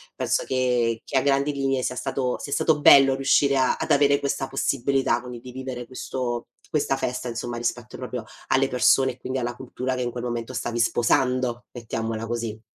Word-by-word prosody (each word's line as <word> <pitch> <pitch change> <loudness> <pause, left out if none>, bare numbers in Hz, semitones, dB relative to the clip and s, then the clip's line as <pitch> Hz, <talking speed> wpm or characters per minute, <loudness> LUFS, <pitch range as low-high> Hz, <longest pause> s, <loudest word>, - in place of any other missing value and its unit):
penso - - 0
che 125 -3 +1
che 135 - -1
a - - +4
grandi 140 +1 +1
linee 135 -1 0
sia 125 - -2
stato 130 0 -2
sia 140 - -7
stato 155 -2 +2
bello 135 -2 +8
riuscire 140 +1 +3
a 130 -1 +2
ad - - -3
avere 140 0 +4
questa 140 -1 -2
possibilità, 135 -2 +1
quindi, 125 -1 -8
di 125 - -10
vivere 130 -1 -6
questo 125 -1 -4 0.2
questa 140 -3 0
festa, 125 -1 -3
insomma, 120 +1 -4
rispetto 120 -1 -3
proprio 125 -3 -5 0.2
alle 135 +1 +3
persone, 130 +1 +3
e - - -20
quindi, 130 +1 -3
alla 120 -1 -3
cultura 130 +1 -4
che, 125 - -3
in 120 -1 -2
quel 120 0 -6
momento, 120 0 -3
stavi 120 -1 -3
sposando, 120 +1 +1
mettiamola 115 -1 -4
così. 115 -2 -3
125 Hz, 190 wpm, -24 LUFS, 120-135 Hz, 0.2 s, bello